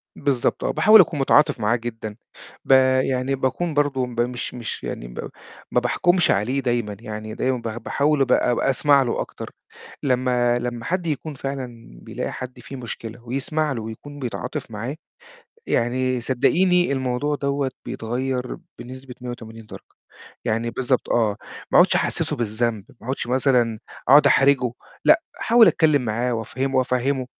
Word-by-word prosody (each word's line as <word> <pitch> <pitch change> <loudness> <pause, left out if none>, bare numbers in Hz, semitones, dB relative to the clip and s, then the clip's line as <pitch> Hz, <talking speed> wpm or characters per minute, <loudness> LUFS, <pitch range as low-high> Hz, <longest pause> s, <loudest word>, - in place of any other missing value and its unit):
بالضبط، 135 -4 0
آه، - - +1
باحاول 215 0 +7
أكون 165 -4 -1
متعاطف 135 0 +4
معاه 105 +2 +2
جدًا 115 -3 -6 0.5
ب - - -1 0.3
يعني 130 +1 0
باكون 135 +6 -1
برضه 145 -3 +1
ب 120 -1 -2
مش 120 0 -3
مش 120 -2 -5
يعني - - -5
ب - - -7 0.4
ما - - +3
باحكُمش 175 +8 +2
عليه 120 +8 +1
دايمًا 120 -5 -1
يعني، 110 -1 -7
دايمًا 130 0 0
باح 115 -2 -5
باحاول 145 +4 0
أب 135 - +2 0.3
أسمع 140 +1 +3
له 120 - -1
أكتر، - - -7 0.5
لمّا 125 -2 +2
لمّا 120 -1 -4
حد 180 -1 -1
يكون 155 0 -3
فعلًا 125 - -7
بيلاقي - - -5
حد 130 0 -7
فيه 140 - -9
مشكلة، 115 -2 -7
ويسمع 145 +5 -1
له، 120 -4 -3
ويكون 130 +7 -9
بيتعاطف 125 +1 -5
معاه، 115 +6 -4 0.7
يعني 125 +1 0
صدّقيني 175 +8 +2
الموضوع 130 +2 -1
دوّة 140 -1 -1
بيتغيّر 125 +2 -3 0.2
بنسبة 130 0 -9
180 115 -2 -8
درجة، - - -13 0.5
يعني 115 +2 -1
بالضبط 130 +1 -1
آه، 110 -4 +2 0.3
ما - - +5
أقعُدش - - +6
أحسّسه - - 0
بالذنب 110 -2 -1 0.2
ما 115 - -13
أقعُدش 130 -1 -2
مثلًا 125 -3 +2 0.3
أقعُد 145 +3 +8
أحرجه، 135 -3 +4 0.3
لأ - - +5 0.2
احاول 230 0 +6
أتكلم 155 -4 +3
معاه 120 +3 -1
وأفَهّمه 130 +4 -2
وأفَهّمه، 130 +1 0
125 Hz, 150 wpm, -22 LUFS, 120-140 Hz, 0.7 s, أقعُد